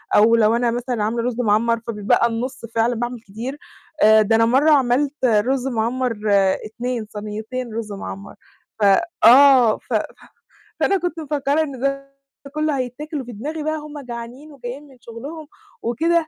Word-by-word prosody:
أو 225 +2 +6
لو 225 0 +3
أنا 235 -1 +1
مثلًا 240 -2 -2
عاملة 230 +2 -1
رز 245 0 -2
معَمّر، 230 +1 +2
فبيتبقى 215 +1 +2
النُص، 235 +1 -4
فعلًا 230 +2 +2
باعمل 240 +1 -4
كتير. 230 +7 -7 0.5
آآ، 220 0 +7
ده 220 +2 +2
أنا 225 0 +4
مرّة 270 +7 +4
عملت 275 +1 +2
رز 250 +3 +1
معَمّر 240 0 -1 0.5
2 235 0 -4
صنيتين 220 +3 -6
رز 220 -1 -5
معَمّر، 100 - -8 0.4
ف 210 - -1 0.4
آه، 255 -3 +7
ف - - -9
ف - - +3 0.8
فأنا 395 - +2
كنت 350 -2 -3
مفكّرة 295 0 0
إن 280 -4 -7
ده 275 +1 -2 0.4
كُلّه 305 -2 0
هيتاكل، 275 +4 -4
وفي 245 -1 -9
دماغي 295 +9 -5
بقى 310 +1 -1
هُم 300 -1 -8
جعانين 245 +3 -8
وجايين 275 +1 -8
من 265 - -18
شُغلهُم 280 +8 -9 0.3
وكده، 325 +7 +1
245 Hz, 160 wpm, -21 LUFS, 230-280 Hz, 0.8 s, آآ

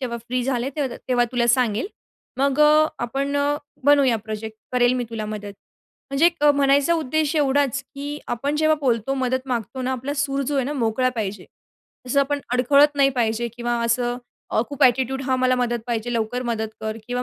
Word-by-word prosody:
जेव्हा 240 -3 -3
फ्री 245 +2 -3
झाले 255 +1 -1
तर 270 -5 -2
तेव्हा 245 -1 +3
तुला 240 -1 +1
सांगेल. 235 - +2 0.5
मग 280 +1 +1
अ, 305 +1 +6 0.2
आपण 275 +4 -2
अ, 285 +1 +1 0.3
बनवूया 280 -5 +5
प्रोजेक्ट. 220 0 -6 0.2
करेल 245 0 +3
मी 245 - -1
तुला 220 -2 -4
मदत. 210 -1 -6 0.6
म्हणजे 280 +5 +4
एक 335 -4 0
म्हणायचा 285 +2 +4
उद्देश 310 0 0
एवढाच, 280 -1 +1
की 290 +1 -5
आपण 280 +5 -1
जेव्हा 310 0 +3
बोलतो, 250 -1 0
मदत 260 0 -1
मागतो 250 +1 -3
ना 260 +1 -1
आपला 260 +3 -4
सूर 280 -1 -1
जो 290 - -1
आहे 265 - +1
ना 285 - -3
मोकळा 250 -1 +1
पाहिजे. 200 -3 -3 0.6
तसं 280 +3 +2
आपण 285 +1 0
अडखळत 280 +4 +4
नाही 275 -1 +5
पाहिजे, 230 +1 0
किंवा 240 0 -1
असं 240 +1 0 0.4
अ, - - +4
खूप 285 0 -4
ॲटिट्यूड 265 +2 +2
हा 260 -1 0
मला 255 0 +2
मदत 240 -1 0
पाहिजे 240 0 -2
लवकर 230 +2 -1
मदत 220 -2 -2
कर, 220 0 -3
किंवा 245 0 -2
255 Hz, 190 wpm, -22 LUFS, 235-280 Hz, 0.6 s, अ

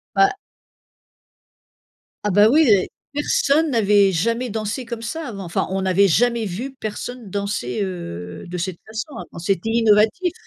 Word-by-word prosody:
Bah 390 +1 +5 1.9
Ah 210 - +1
bah 205 +3 +6
oui! 305 0 +5 0.5
Personne 295 +1 +2
n'avait 205 -4 +4
jamais 230 +8 0
dansé 220 +4 -3
comme 235 -1 -6
ça 300 +5 -5
avant, 200 -4 -7
enfin, 170 - -1
on 195 - -1
n'avait 190 +1 +4
jamais 235 +5 +2
vu 230 +8 -5
personne 225 0 -6
danser, 200 - -3
heu, 90 - -6
de 180 +1 -5
cette 180 0 -3
façon 225 +7 -6
avant, - - -9
c'était 195 +4 -1
innovatif. 225 - +3
215 Hz, 145 wpm, -21 LUFS, 190-245 Hz, 1.9 s, bah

